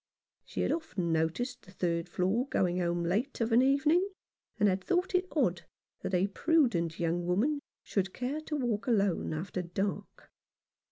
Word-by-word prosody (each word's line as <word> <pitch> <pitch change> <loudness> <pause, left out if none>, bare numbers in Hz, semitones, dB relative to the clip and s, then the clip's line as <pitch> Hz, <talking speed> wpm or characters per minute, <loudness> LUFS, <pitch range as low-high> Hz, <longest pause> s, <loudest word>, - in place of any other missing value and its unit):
She - - -4
had - - +1
often 195 - -2
noticed 165 +11 -1
the 185 - -16
third 170 -2 -1
floor 195 +9 +1
going 180 -7 +1
home 175 -1 0
late 210 +11 -1
of 230 0 0
an 230 +2 +6
evening, 300 +8 +3 0.5
and 210 - +5
had 190 -1 +1
thought 360 +1 0
it 365 0 +2
odd 180 - 0 0.3
that 190 - -2
a 180 +2 +3
prudent 200 - +1
young 170 +1 0
woman 245 +12 +2 0.2
should 190 -2 -1
care 260 +7 -3
to 310 0 -4
walk 240 -6 -1
alone 200 -7 +2
after 180 +4 -3
dark. 190 +3 -4
200 Hz, 165 wpm, -31 LUFS, 175-270 Hz, 0.5 s, an